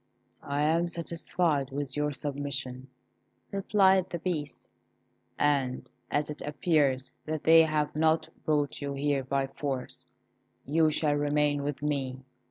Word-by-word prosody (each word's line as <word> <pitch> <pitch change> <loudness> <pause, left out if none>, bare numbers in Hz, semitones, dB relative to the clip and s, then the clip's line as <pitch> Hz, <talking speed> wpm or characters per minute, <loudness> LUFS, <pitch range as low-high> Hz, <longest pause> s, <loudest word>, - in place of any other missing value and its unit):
"I 140 +1 -1
am 165 +3 +2
satisfied 170 -4 -1
with 140 -1 -4
your 150 0 0
submission," 140 -2 -3 0.6
replied 190 -2 +3
the 170 - -3
Beast; 155 -5 -4 0.7
"and 140 -3 0 0.2
as 145 +1 0
it 150 - -8
appears 145 -4 +1
that 155 -1 -3
they 165 0 +8
have 155 -2 0
not 160 +1 +2 0.2
brought 150 -2 0
you 140 -1 -3
here 140 -1 0
by 135 +1 0
force, 135 -1 -5 0.6
you 155 +2 +3
shall 150 -1 +2
remain 145 0 +1
with 145 0 -4
me. 135 -3 -2
145 Hz, 130 wpm, -29 LUFS, 140-155 Hz, 0.7 s, they